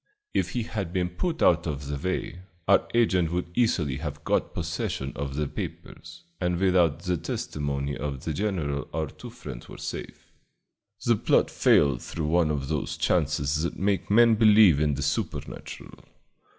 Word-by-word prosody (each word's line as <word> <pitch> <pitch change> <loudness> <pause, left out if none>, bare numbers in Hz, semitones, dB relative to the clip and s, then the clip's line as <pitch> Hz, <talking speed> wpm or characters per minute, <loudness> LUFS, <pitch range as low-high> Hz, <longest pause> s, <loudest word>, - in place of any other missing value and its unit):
If - - 0
he 120 - -1
had 100 -6 -4
been 90 -1 0
put 165 - -2
out 85 0 +4
of 70 -2 -4
the 70 +1 -3
way, 90 -1 -3 0.3
our 100 - +4
agent 95 -8 +3
would 85 0 -3
easily 85 - +1
have 75 -1 -6
got - - 0
possession 70 +2 -3
of 70 -1 -4
the 75 0 -1
papers, 85 +4 -8 0.2
and 90 -1 0
without 85 -4 +2
the 90 -1 0
testimony 70 -2 -3
of 70 -2 -4
the 80 - -2
general 80 -7 -2
our 80 -1 0
two - - -10
friends - - -9
were - - -9
safe. - - -7 0.7
The 120 - +4
plot - - +2
failed 70 -5 +3
through 80 - -4
one 80 +1 +2
of 70 -3 -2
those 75 -1 -2
chances 75 -3 +1
that 85 - -2
make 100 +1 0
men 115 +2 +6
believe 105 -7 +6
in 75 -2 +2
the 70 - -3
supernatural. 75 +1 -4
80 Hz, 165 wpm, -26 LUFS, 70-95 Hz, 0.7 s, men